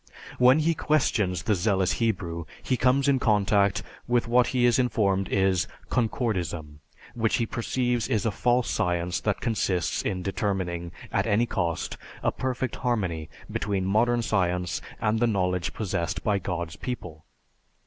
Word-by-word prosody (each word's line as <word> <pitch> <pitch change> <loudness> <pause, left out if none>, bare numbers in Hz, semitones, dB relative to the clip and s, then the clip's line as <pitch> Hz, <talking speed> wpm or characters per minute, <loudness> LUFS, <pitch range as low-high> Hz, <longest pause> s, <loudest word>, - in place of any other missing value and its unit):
When 125 +3 +7
he 160 +2 +2
questions 105 - +1
the 105 - +2
zealous 95 -1 +1
Hebrew, 85 -7 -1 0.2
he 130 - +1
comes 130 +3 +3
in 135 -2 +4
contact 100 -3 +2 0.2
with 120 -1 +2
what 120 +1 +4
he 125 -2 +2
is 120 +1 +4
informed 100 -6 +1
is 95 -2 +2 0.2
Concordism, 90 - -1 0.3
which 115 -2 +1
he 115 - +1
perceives 120 0 -1
is 110 -1 0
a 110 - +2
false 120 +3 +1
science 90 0 0
that 105 -2 -1
consists 95 -7 0
in 90 -1 -2
determining, 95 -4 -2 0.2
at - - +1
any 110 +4 +3
cost, 85 -8 -2 0.3
a - - +2
perfect 130 -2 -3
harmony 95 - -1 0.2
between 100 -3 -1
modern 120 +4 +2
science 90 -5 0 0.2
and 110 +1 +1
the 120 - +3
knowledge 90 -4 0
possessed 85 -5 -2
by 105 -2 +1
God's 85 -3 -4
people. 90 -11 -6
105 Hz, 150 wpm, -26 LUFS, 90-120 Hz, 0.3 s, When